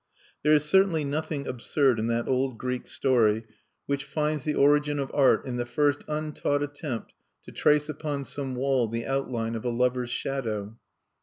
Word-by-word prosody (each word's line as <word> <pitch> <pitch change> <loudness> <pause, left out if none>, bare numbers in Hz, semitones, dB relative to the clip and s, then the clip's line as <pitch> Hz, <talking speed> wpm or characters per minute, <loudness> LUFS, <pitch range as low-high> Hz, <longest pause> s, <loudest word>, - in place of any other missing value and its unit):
There 150 +1 +4
is 150 -1 +4
certainly 170 -1 +3
nothing 145 0 -3
absurd 130 0 +1
in 110 - -1
that 115 0 0
old 130 -2 0
Greek 125 +1 -3
story 115 -5 +2 0.4
which 140 -1 -1
finds 150 0 -1
the 150 - -1
origin 145 +1 +3
of 140 -1 -3
art 140 -2 +4
in 125 -2 -3
the 120 - -1
first 145 +3 +1
untaught 150 -1 -1
attempt 145 -4 -5 0.3
to - - -11
trace 150 0 +3
upon 150 -2 -3
some 135 -1 -4
wall 130 -2 +1
the 115 +1 -4
outline 125 -4 -2
of 115 - -4
a 125 - 0
lover's 125 +1 0
shadow. 115 -5 -3
135 Hz, 170 wpm, -27 LUFS, 120-150 Hz, 0.4 s, There